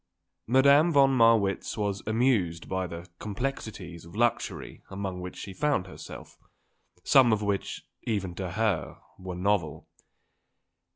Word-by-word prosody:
Madame 140 Hz, +6 st, +5 dB
von 135 Hz, -3 st, +5 dB
Marwitz 115 Hz, -5 st, +3 dB
was 100 Hz, -2 st, -1 dB
amused 110 Hz, -8 st, +1 dB
by 95 Hz, -1 st, -2 dB
the 85 Hz, +1 st, -8 dB
complexities 105 Hz, -6 st, -5 dB
of 85 Hz, +3 st, -13 dB
luxury 120 Hz, 0 st, -1 dB
among 95 Hz, -2 st, -4 dB
which 90 Hz, 0 st, -7 dB
she 95 Hz, -, -7 dB
found 140 Hz, -1 st, 0 dB
herself, 95 Hz, -, -11 dB, 0.6 s
some 130 Hz, -3 st, +6 dB
of 105 Hz, -1 st, +1 dB
which, 100 Hz, -1 st, -2 dB, 0.2 s
even 100 Hz, -5 st, -2 dB
to 90 Hz, -1 st, -5 dB
her, 105 Hz, -7 st, -1 dB, 0.2 s
were 95 Hz, -1 st, -6 dB
novel. 90 Hz, -5 st, -1 dB
100 Hz, 125 wpm, -28 LUFS, 90-120 Hz, 0.6 s, some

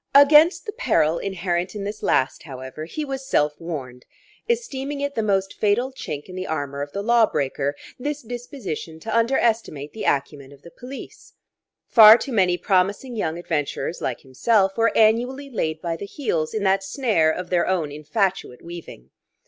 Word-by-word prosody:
Against 300 Hz, -, +7 dB
the 420 Hz, -, -4 dB
peril 170 Hz, -, +1 dB
inherent 185 Hz, -1 st, -2 dB
in 205 Hz, -, -4 dB
this 205 Hz, +1 st, -5 dB
last, 130 Hz, -, +1 dB
however, 130 Hz, +1 st, -8 dB
he 300 Hz, -, -5 dB
was 270 Hz, -1 st, -5 dB
self 150 Hz, -, +1 dB
warned, 130 Hz, -7 st, -7 dB, 0.4 s
esteeming 290 Hz, -, -2 dB
it 285 Hz, 0 st, -2 dB
the 225 Hz, -, -1 dB
most 195 Hz, -2 st, 0 dB
fatal 220 Hz, +5 st, +1 dB
chink 150 Hz, -, -6 dB
in 185 Hz, -, -11 dB
the 185 Hz, 0 st, -4 dB
armour 140 Hz, -3 st, -3 dB
of 145 Hz, 0 st, -5 dB
the 200 Hz, -, -4 dB
lawbreaker, 150 Hz, -, +1 dB, 0.2 s
this 295 Hz, +2 st, -4 dB
disposition 230 Hz, -, -6 dB
to 225 Hz, +5 st, -4 dB
underestimate 230 Hz, -, 0 dB
the 220 Hz, -, -5 dB
acumen 140 Hz, 0 st, -1 dB
of 140 Hz, 0 st, -17 dB
the 170 Hz, -, -13 dB
police: 255 Hz, +7 st, -11 dB, 0.5 s
far 220 Hz, -1 st, +9 dB
too 270 Hz, -, -6 dB
many 185 Hz, -4 st, +3 dB
promising 200 Hz, +7 st, 0 dB
young 165 Hz, -6 st, -2 dB
adventurers 165 Hz, -1 st, -3 dB
like 125 Hz, -, -3 dB
himself 195 Hz, -, +1 dB
were 230 Hz, 0 st, +3 dB
annually 245 Hz, +6 st, +2 dB
laid 160 Hz, -9 st, -2 dB
by 170 Hz, -1 st, -1 dB
the 200 Hz, +5 st, -7 dB
heels 170 Hz, -, -2 dB
in 215 Hz, -, -1 dB
that 195 Hz, 0 st, +2 dB
snare 210 Hz, -, +1 dB
of 175 Hz, +3 st, -3 dB
their 175 Hz, -1 st, +2 dB
own 170 Hz, -6 st, 0 dB
infatuate 155 Hz, -, -2 dB
weaving. 170 Hz, -, -10 dB
190 Hz, 170 wpm, -23 LUFS, 155-235 Hz, 0.5 s, far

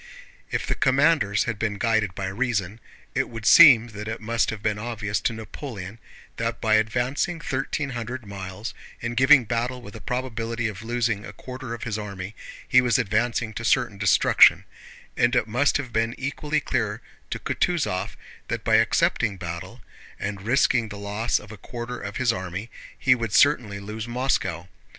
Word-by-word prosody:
If -, -, -2 dB
the -, -, 0 dB
commanders 135 Hz, -6 st, +3 dB
had 115 Hz, -5 st, -4 dB
been 105 Hz, -3 st, -1 dB
guided 110 Hz, -4 st, +1 dB
by 100 Hz, -, -3 dB
reason, 105 Hz, -1 st, -2 dB, 0.3 s
it -, -, 0 dB
would 115 Hz, -2 st, -8 dB
seem 120 Hz, -3 st, +8 dB
that 105 Hz, -1 st, -7 dB
it 110 Hz, 0 st, -4 dB
must 115 Hz, +1 st, 0 dB
have 110 Hz, -2 st, -5 dB
been 105 Hz, -1 st, 0 dB
obvious 105 Hz, -2 st, -3 dB
to -, -, +1 dB
Napoleon 110 Hz, -2 st, -8 dB, 0.4 s
that 115 Hz, 0 st, -2 dB
by 110 Hz, -1 st, +1 dB
advancing 120 Hz, +10 st, +1 dB
thirteen 135 Hz, -1 st, -2 dB
hundred 120 Hz, 0 st, -5 dB
miles 100 Hz, +2 st, -7 dB, 0.3 s
and 120 Hz, 0 st, -4 dB
giving 130 Hz, 0 st, +6 dB
battle 125 Hz, +3 st, -2 dB
with 100 Hz, -4 st, -11 dB
a -, -, -9 dB
probability 120 Hz, -2 st, -2 dB
of 105 Hz, -2 st, -6 dB
losing 115 Hz, -2 st, -1 dB
a -, -, -8 dB
quarter 130 Hz, -2 st, -7 dB
of 120 Hz, -, -9 dB
his 110 Hz, -2 st, -3 dB
army, 100 Hz, -1 st, -6 dB, 0.3 s
he 125 Hz, -1 st, +6 dB
was 125 Hz, -3 st, +2 dB
advancing 115 Hz, +2 st, 0 dB
to 115 Hz, -, -5 dB
certain 105 Hz, -3 st, +1 dB
destruction, 105 Hz, -, +5 dB, 0.5 s
and 120 Hz, +1 st, +2 dB
it -, -, +3 dB
must 125 Hz, +6 st, +2 dB
have 130 Hz, -5 st, -6 dB
been 115 Hz, +1 st, 0 dB
equally 145 Hz, +3 st, -2 dB
clear 115 Hz, -6 st, -2 dB, 0.3 s
to -, -, -3 dB
Kutúzov 150 Hz, -, -1 dB, 0.3 s
that -, -, -3 dB
by -, -, +4 dB
accepting 100 Hz, -4 st, +2 dB
battle 85 Hz, -1 st, -7 dB, 0.4 s
and 100 Hz, -1 st, -4 dB
risking 115 Hz, 0 st, +2 dB
the 105 Hz, -, -7 dB
loss 105 Hz, +3 st, -1 dB
of 105 Hz, -, -9 dB
a 110 Hz, -, -9 dB
quarter 120 Hz, +4 st, -6 dB
of 100 Hz, 0 st, -5 dB
his 125 Hz, -3 st, +2 dB
army 95 Hz, +4 st, -5 dB, 0.3 s
he 130 Hz, -, +4 dB
would 115 Hz, -4 st, -3 dB
certainly 120 Hz, -9 st, +3 dB
lose 105 Hz, +3 st, -6 dB
Moscow. 120 Hz, -9 st, -1 dB
115 Hz, 175 wpm, -24 LUFS, 105-125 Hz, 0.5 s, seem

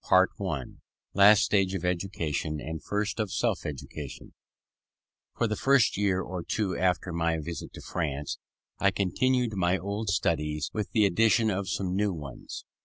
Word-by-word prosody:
CHAPTER -, -, +6 dB
III -, -, -4 dB, 0.4 s
LAST 100 Hz, +1 st, +7 dB
STAGE 95 Hz, -2 st, +2 dB
OF 90 Hz, -2 st, -3 dB
EDUCATION, 85 Hz, -4 st, -2 dB
AND 80 Hz, +1 st, -6 dB
FIRST 105 Hz, +2 st, -2 dB
OF 105 Hz, -4 st, -1 dB
SELF -, -, 0 dB
EDUCATION 70 Hz, 0 st, -7 dB, 1.0 s
For -, -, +2 dB
the 105 Hz, -, -1 dB
first 135 Hz, +1 st, +4 dB
year 95 Hz, -2 st, +1 dB
or 90 Hz, -1 st, -5 dB
two 100 Hz, -1 st, -1 dB
after 90 Hz, -1 st, 0 dB
my 85 Hz, -1 st, +1 dB
visit 80 Hz, +2 st, -6 dB
to -, -, -9 dB
France, 75 Hz, -4 st, -3 dB, 0.4 s
I 100 Hz, -, +4 dB
continued 120 Hz, +5 st, +1 dB
my 90 Hz, 0 st, +2 dB
old 100 Hz, +3 st, -3 dB
studies, 75 Hz, -4 st, 0 dB
with 105 Hz, -2 st, -2 dB
the 110 Hz, -2 st, +4 dB
addition 110 Hz, +3 st, +3 dB
of 95 Hz, -1 st, -2 dB
some 90 Hz, +1 st, -1 dB
new 100 Hz, -1 st, +1 dB
ones. 70 Hz, -6 st, -8 dB
95 Hz, 160 wpm, -28 LUFS, 85-105 Hz, 1.0 s, LAST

